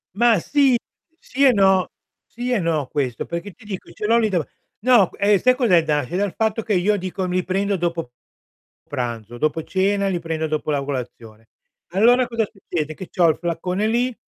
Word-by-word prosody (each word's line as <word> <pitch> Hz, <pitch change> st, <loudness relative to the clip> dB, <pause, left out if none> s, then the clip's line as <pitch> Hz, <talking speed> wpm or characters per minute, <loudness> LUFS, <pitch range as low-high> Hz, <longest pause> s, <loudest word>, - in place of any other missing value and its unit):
Ma 230 Hz, -3 st, +4 dB
sì, 275 Hz, -, +3 dB, 0.4 s
sì 275 Hz, +3 st, -2 dB
e 260 Hz, -, +7 dB
no, 190 Hz, -3 st, +3 dB, 0.4 s
sì 245 Hz, +2 st, -5 dB
e 235 Hz, -, +2 dB
no 160 Hz, -5 st, -1 dB
questo, 130 Hz, -4 st, -2 dB
perché 170 Hz, +4 st, -5 dB
ti 220 Hz, +3 st, -20 dB
dico 195 Hz, -3 st, -7 dB
ce 210 Hz, -, -6 dB
l'ho 230 Hz, +2 st, +4 dB
lì 220 Hz, -2 st, +2 dB
dav 175 Hz, -6 st, 0 dB, 0.3 s
no 230 Hz, -5 st, +4 dB
q 205 Hz, 0 st, +2 dB
sai 255 Hz, 0 st, +4 dB
cos'è 195 Hz, -11 st, +3 dB
da 150 Hz, -2 st, +1 dB
nasce 145 Hz, +4 st, -3 dB
dal 200 Hz, -2 st, -1 dB
fatto, 220 Hz, 0 st, 0 dB
che 215 Hz, -, -1 dB
io 200 Hz, +3 st, +2 dB
dico 185 Hz, 0 st, -4 dB
li 180 Hz, 0 st, -1 dB
prendo 200 Hz, +2 st, 0 dB
dopo 170 Hz, -6 st, -3 dB, 0.8 s
pranzo, 120 Hz, -5 st, -5 dB
dopo 155 Hz, +4 st, -1 dB
cena 200 Hz, +1 st, 0 dB
li 180 Hz, -3 st, -1 dB
prendo 160 Hz, -1 st, -3 dB
dopo 155 Hz, 0 st, -2 dB
la 140 Hz, -1 st, 0 dB
colazione. 115 Hz, -5 st, -7 dB, 0.4 s
Allora 240 Hz, +7 st, +4 dB
cosa 230 Hz, -2 st, -1 dB
succede? 165 Hz, -6 st, -4 dB
Che 185 Hz, -, -9 dB
c'ho 175 Hz, -3 st, +3 dB
il 155 Hz, -, +1 dB
flacone 180 Hz, +4 st, -2 dB
lì, 240 Hz, +2 st, 0 dB
185 Hz, 195 wpm, -21 LUFS, 160-215 Hz, 0.8 s, e